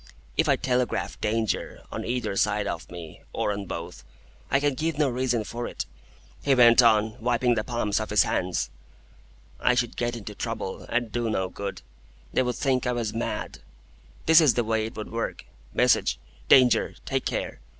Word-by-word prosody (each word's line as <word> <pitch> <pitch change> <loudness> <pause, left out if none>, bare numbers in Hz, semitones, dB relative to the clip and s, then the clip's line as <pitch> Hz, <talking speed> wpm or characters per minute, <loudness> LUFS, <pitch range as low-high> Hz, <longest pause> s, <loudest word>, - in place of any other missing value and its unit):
"If - - +2
I - - +5
telegraph 125 -2 -1
Danger, 110 0 -1
on - - -4
either 120 -4 -2
side 105 +1 +1
of 85 -5 -4
me, 85 -3 -9
or 105 - 0
on 100 -1 -5
both, 85 +1 -6 0.5
I 135 - +3
can 145 0 +1
give 155 +2 -2
no 150 -2 +3
reason 125 -2 0
for 120 +3 -5
it," - - -4 0.6
he 140 -1 +4
went 120 -1 +7
on, 110 -2 +3
wiping 120 +1 +2
the 110 -2 0
palms 120 -4 -1
of 110 - -4
his 105 -3 +5
hands. 90 0 -1 0.9
"I 125 - +3
should 120 -2 0
get 120 0 -1
into 105 -2 -7
trouble, - - -5
and 120 -2 0
do 120 +1 -1
no 95 -3 -1
good. 100 +2 -6 0.5
They - - +3
would 125 -1 -1
think 130 -3 0
I 125 - +1
was 115 -3 -2
mad. 115 +1 -3 0.7
This 160 +1 +8
is 140 -8 +4
the 120 - +2
way 110 0 0
it - - -10
would 110 - -6
work,—Message: 115 - 0 0.3
'Danger! 125 -2 +5
Take - - -1
care! - - -3
115 Hz, 180 wpm, -26 LUFS, 105-125 Hz, 0.9 s, This